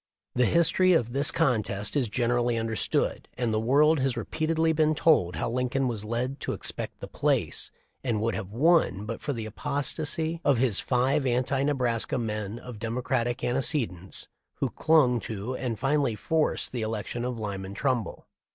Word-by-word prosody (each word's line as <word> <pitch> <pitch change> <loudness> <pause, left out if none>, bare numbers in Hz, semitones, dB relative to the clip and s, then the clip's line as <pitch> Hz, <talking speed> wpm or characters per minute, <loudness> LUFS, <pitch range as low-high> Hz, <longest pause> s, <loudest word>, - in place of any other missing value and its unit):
The 125 -1 +3
history 170 +2 +4
of 120 -7 +1
this 140 +2 +4
contest 105 -4 0
is 130 -6 +1
generally 120 +1 +1
understood, 115 -2 -1
and 120 -3 0
the 110 - +1
world 145 +7 +4
has 130 -2 0
repeatedly 160 +6 0
been 155 0 +2
told 145 - +3
how 80 - -2
Lincoln 125 +2 0
was 115 -4 -2
led 120 +5 -2
to - - -3
expect - - -5
the - - -6
place - - -1 0.3
and 120 -5 0
would 115 +1 0
have 95 - -4
won 130 - +3
but 115 +1 -5
for 145 - -2
the 115 -5 -4
apostasy 155 +7 -2
of 140 -5 +3
the 130 -1 +3
five 130 +7 +1
anti 130 +2 +1
Nebraska 125 -6 +1
men 105 -2 -3
of 120 -3 -9
Democratic 120 +1 -1
antecedents 120 - -1 0.3
who - - -2
clung 140 -7 +3
to 110 +3 -5
and 125 -4 -3
finally 135 -1 +1
forced 160 +7 0
the 125 - -3
election 110 +2 -3
of 125 -1 -3
Lyman 100 -2 -5
Trumbull. 125 -2 -1
125 Hz, 165 wpm, -27 LUFS, 110-140 Hz, 0.3 s, history